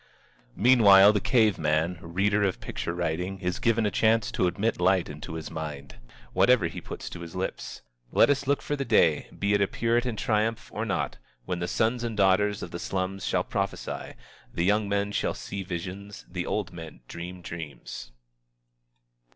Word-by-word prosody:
Meanwhile, 105 -4 +7
the 105 - +2
cave 110 -6 +3
man, 80 +3 0
reader 100 +5 +1
of 95 -2 0
picture 85 - -4
writing, 90 +3 -2
is 90 -2 -2
given 115 -1 +2
a 105 - +1
chance 110 +1 +2
to 90 - +1
admit 105 +4 -1
light 95 0 +3
into 75 +2 -7
his 80 -1 -6
mind, 75 -5 -6 0.4
whatever 125 -7 +4
he 80 - -4
puts - - -8
to - - -7
his 85 0 -9
lips. 95 +1 -4 0.3
Let - - +5
us 140 -1 -1
look 140 0 +1
for 145 - -1
the 140 - -2
day, 105 - +3
be 100 0 +1
it 100 - +3
a 100 - +3
puritan 120 +2 0
triumph 110 +1 -1
or - - -2
not, - - -2 0.3
when 90 +5 -3
the 85 - -2
sons 115 +5 0
and 115 -2 -3
the 100 - +4
daughters 105 +2 +2
of 85 - -7
the 85 - -5
slums 95 +2 -3
shall - - +1
prophesy, - - -4 0.4
the 85 - -1
young 105 +1 +2
men 100 0 0
shall - - -1
see 100 - -6
visions, 95 +2 -6
the 90 -1 -4
old 105 -4 -2
men 80 -3 -9
dream 90 +1 -8
dreams. 70 -8 -8
95 Hz, 185 wpm, -27 LUFS, 85-105 Hz, 0.4 s, Meanwhile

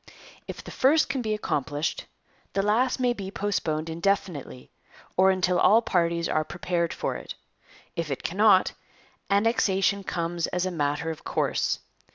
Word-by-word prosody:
If - - -7
the - - -9
first 295 +4 +3
can 275 -2 -1
be 215 -2 -1
accomplished, 145 -5 -2 0.5
the 195 - +1
last 235 +6 +2
may 250 -1 +2
be 195 -5 -6
postponed 165 -6 -2
indefinitely, 165 -6 -2 0.4
or 190 +1 +5
until 185 -1 +2
all 225 +3 +5
parties 170 -3 +1
are 155 - +1
prepared 175 0 -2
for - - -3
it. - - -8 0.6
If 165 -2 -3
it 140 - -4
cannot, 195 +1 +4 0.6
Annexation 200 -2 +2
comes 170 -2 -2
as 180 0 -1
a 185 - -1
matter 145 0 -1
of 160 - -9
course. - - 0
185 Hz, 150 wpm, -26 LUFS, 165-205 Hz, 0.6 s, or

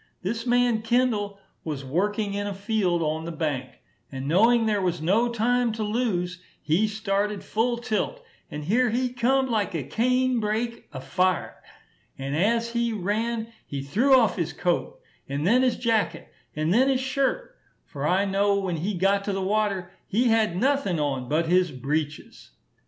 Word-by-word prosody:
This 230 +5 -3
man 245 -2 +3
Kendall 225 -4 +1 0.3
was 145 -4 -5
working 200 +8 -1
in 205 0 -2
a 200 - -4
field 195 -4 0
on 155 +1 -2
the 170 - -4
bank, 150 -6 -2 0.4
and 135 0 -5
knowing 225 +8 +4
there 210 -2 +1
was 175 -2 0
no 210 +10 +2
time 240 +1 +1
to 220 0 -3
lose, 195 -6 -1 0.2
he 175 +8 +1
started 210 -1 -1
full 235 +2 0
tilt, 235 - -2 0.3
and 150 0 -6
here 240 +9 +2
he 250 +2 -1
come 260 +2 +2
like 210 -6 -1
a 155 - -2
cane 250 - +1
brake 225 +2 -2
afire; 155 +6 -1 0.6
and 135 +1 -3
as 230 +7 +1
he 235 0 0
ran, 220 +3 -2
he 140 -1 -4
threw 240 - +4
off 230 -4 +2
his 170 -2 -2
coat, 180 - -1 0.3
and 140 +3 -2
then 240 +7 +4
his 255 -2 +2
jacket, 215 -8 -1 0.2
and 155 +3 +1
then 260 +5 +4
his 265 -1 +2
shirt, 270 - -1 0.3
for 145 -1 -4
I 190 +4 +2
know 200 +1 +2
when 185 -4 -2
he 190 +6 -2
got 195 +2 +2
to 200 - -1
the 195 - -2
water 195 -3 0 0.2
he 235 +4 +2
had 220 -6 +2
nothing 250 - +1
on 135 -4 -2
but 160 +3 +1
his 180 0 +2
breeches. 145 - -4
205 Hz, 170 wpm, -25 LUFS, 170-235 Hz, 0.6 s, knowing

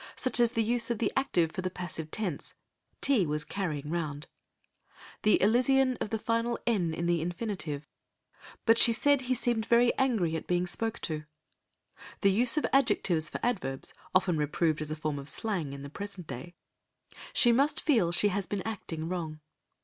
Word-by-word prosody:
Such 255 -2 +1
is 235 0 +3
the 225 - +1
use 235 +1 +2
of 235 - 0
the 210 -1 -1
active 180 -12 +1
for 185 - -4
the 185 - -2
passive 175 -3 -5
tense, 185 -5 -4 0.5
"tea 245 - +3
was 150 0 -1
carrying 155 -7 -4
round"; 155 -4 -3 1.0
the 215 - +4
elision 255 +4 +3
of - - -4
the 220 - -1
final 230 +2 -1
"n" 195 -8 +1
in 170 +2 -3
the 170 -1 +1
infinitive, 175 -5 -4 0.8
"but 225 0 +5
she 235 - +8
said 285 +4 +3
he 255 0 -1
seemed 235 -2 0
very 240 +1 +4
angry 220 -12 +1
at 160 - -5
being 180 0 +1
spoke 225 +5 -1
to"; 155 -2 -4 1.0
the 200 - +4
use 235 +8 +3
of 300 - +2
adjectives 180 - +2
for - - -5
adverbs 185 - -1 0.2
(often 180 -3 +3
reproved 155 +1 0
as 155 - -4
a 155 - -3
form 155 -2 -3
of 140 +1 -2
slang 180 -5 -2
in 140 0 -8
the - - -6
present 200 -1 -6
day), 170 +7 -8 0.8
"she 240 - +5
must 285 +6 +2
feel 225 - +2
she 205 +4 +3
has 200 -2 -2
been 195 +1 -3
acting 165 -7 -5
wrong." 165 -4 -4
190 Hz, 180 wpm, -29 LUFS, 160-235 Hz, 1.0 s, she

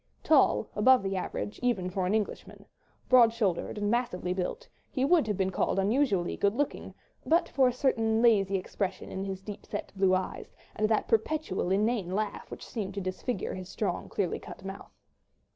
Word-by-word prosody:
Tall, 280 -7 +4
above 255 +3 +5
the 195 0 -2
average, 190 +2 -4
even 235 -8 0
for 185 -1 -1
an 200 - +1
Englishman, 215 -2 -4 0.4
broad 240 -3 +7
shouldered 210 -5 -1
and 205 0 0
massively 185 -7 -1
built, 190 - -4 0.2
he 260 -1 0
would 315 -5 +4
have 210 -3 -1
been 190 -1 0
called 190 - 0
unusually 200 -2 +1
good 200 +2 +1
looking, 285 +2 -3 0.3
but 335 +2 +3
for 265 -2 +3
a - - +2
certain 225 -3 +1
lazy 205 -5 +4
expression 190 0 -4
in 190 +1 -4
his 190 -1 -5
deep 205 0 -8
set - - -6
blue 190 -1 +3
eyes, 185 0 -4 0.2
and 215 0 +1
that 220 - +1
perpetual 225 - 0
inane 205 0 +1
laugh 210 0 -3
which - - -8
seemed 205 -5 -5
to - - -2
disfigure 185 +3 -3
his 185 0 -7
strong, 195 -5 -3
clearly 190 -4 -1
cut 190 - -11
mouth. 195 +1 -8
205 Hz, 180 wpm, -29 LUFS, 190-240 Hz, 0.4 s, broad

